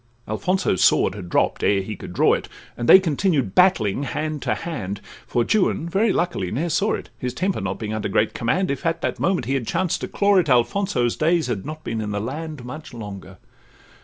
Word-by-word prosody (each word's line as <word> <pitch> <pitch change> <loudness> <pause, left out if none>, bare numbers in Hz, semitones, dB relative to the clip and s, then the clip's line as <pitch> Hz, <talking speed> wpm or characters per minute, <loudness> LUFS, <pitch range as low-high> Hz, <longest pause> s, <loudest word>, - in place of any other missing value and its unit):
Alfonso's 180 - 0
sword - - +4
had 95 -3 -8
dropp'd - - +1
ere 100 -1 +2
he 105 +2 -5
could - - -9
draw 90 - +3
it, - - -3 0.3
And 120 - -3
they - - +11
continued 155 - 0
battling 135 - +3
hand 150 +2 -3
to - - 0
hand, 100 - -5 0.3
For 120 0 +1
Juan 185 -5 +1
very 200 +5 +2
luckily 175 - -1
ne'er 160 - -2
saw 205 +6 +1
it; - - -9
His 125 0 -4
temper 190 +5 -1
not - - -3
being 110 -1 -4
under 110 -2 -2
great 105 +2 +1
command, 160 +10 0
If 140 - -4
at 165 0 -1
that - - -2
moment 180 - +1
he 135 - -1
had 130 -5 -1
chanced 175 0 0
to - - -3
claw 200 -1 +2
it, 170 -5 +2
Alfonso's 125 - +2
days 165 +1 +2
had 120 -2 -3
not 155 0 -7
been 115 -1 -3
in 105 - -3
the 105 0 -2
land 145 +4 -5
Much 145 +1 -8
longer. 100 -4 -8
135 Hz, 215 wpm, -22 LUFS, 110-175 Hz, 0.3 s, they